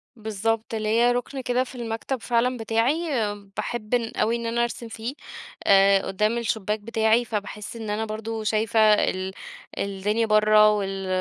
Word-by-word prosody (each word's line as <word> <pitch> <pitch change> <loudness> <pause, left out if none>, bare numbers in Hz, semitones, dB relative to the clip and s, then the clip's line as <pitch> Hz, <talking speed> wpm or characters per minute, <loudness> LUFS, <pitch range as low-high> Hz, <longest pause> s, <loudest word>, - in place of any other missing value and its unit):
بالضبط. 220 +1 -2
ليّا 225 +3 +2
رُكن 245 +2 -3
كده 250 0 +1
في 260 - -11
المكتب 235 +2 -4
فعلًا 245 +2 +1
بتاعي 225 +4 +1 0.6
باحب 225 -1 -4
ان 235 -2 +1
أوي 230 +2 +1
إن 235 - -4
أنا 235 +1 0
أرسم 235 0 -4
فيه، 225 +3 -5 0.5
أ 195 0 +5
قُدّام 210 +4 0
الشباك 220 -2 -1
بتاعي. 220 +2 +2
فباحِس 210 0 -5
إن 225 -2 -6
أنا 215 +2 -1
برضه 220 +1 -5
شايفة 220 +1 +1
ال 190 -2 0 0.4
الدنيا 200 +3 -1
برّه 215 0 +5
وال 195 -2 -2
220 Hz, 150 wpm, -24 LUFS, 210-235 Hz, 0.6 s, أ